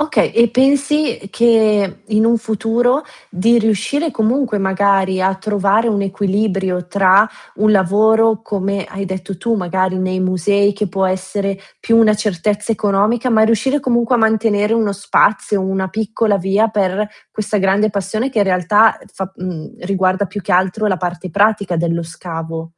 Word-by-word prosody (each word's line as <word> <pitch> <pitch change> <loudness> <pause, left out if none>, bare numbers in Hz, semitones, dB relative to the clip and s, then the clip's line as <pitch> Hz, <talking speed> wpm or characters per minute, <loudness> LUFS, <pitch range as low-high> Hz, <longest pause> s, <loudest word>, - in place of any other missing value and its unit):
Okay. 305 +1 +1
E 235 +1 +4
pensi 280 +4 +1
che 215 -4 +2
in 215 0 +1
un 230 +1 +3
futuro, 235 +4 0 0.3
di 225 +5 +2
riuscire 230 - 0
comunque 230 0 0
magari 190 -1 +1
a 190 +1 +1
trovare 205 +2 0
un 205 -3 0
equilibrio 195 -2 -1
tra 195 +3 +4 0.3
un 215 +1 +2
lavoro, 215 +3 +3
come 200 -2 -3
hai 195 +1 -6
detto 190 0 -6
tu 230 +6 -1
magari 185 -1 -1
nei 185 0 -2
musei 200 +3 +1
che 205 +1 -3
può 190 +1 -1
essere 190 +1 -2 0.2
più 230 - +2
una 220 -2 +5
certezza 210 +1 -2
economica, 215 +3 0
ma 220 -3 +3
riuscire 230 +6 +1
comunque 240 -2 +1
a - - +2
mantenere 220 -1 +1
uno 220 -3 +1
spazio, 200 +1 +1
una 190 0 -2
piccola 215 0 -1
via 195 +4 +1
per 205 0 -1 0.2
questa 215 0 -3
grande 195 +2 +1
passione 205 +6 -3
che 235 - -2
in 205 - +3
realtà, 195 +4 +3
uh, - - -17
fa 190 0 -6
mhmm, 175 -4 -7
riguarda 190 +1 0
più 205 - -7
che - - -3
altro 190 +4 +1
la 190 -3 +1
parte 180 0 -5
pratica 200 -1 +1
dello 170 0 -1
scavo? 165 -1 -7
205 Hz, 160 wpm, -17 LUFS, 190-220 Hz, 0.3 s, una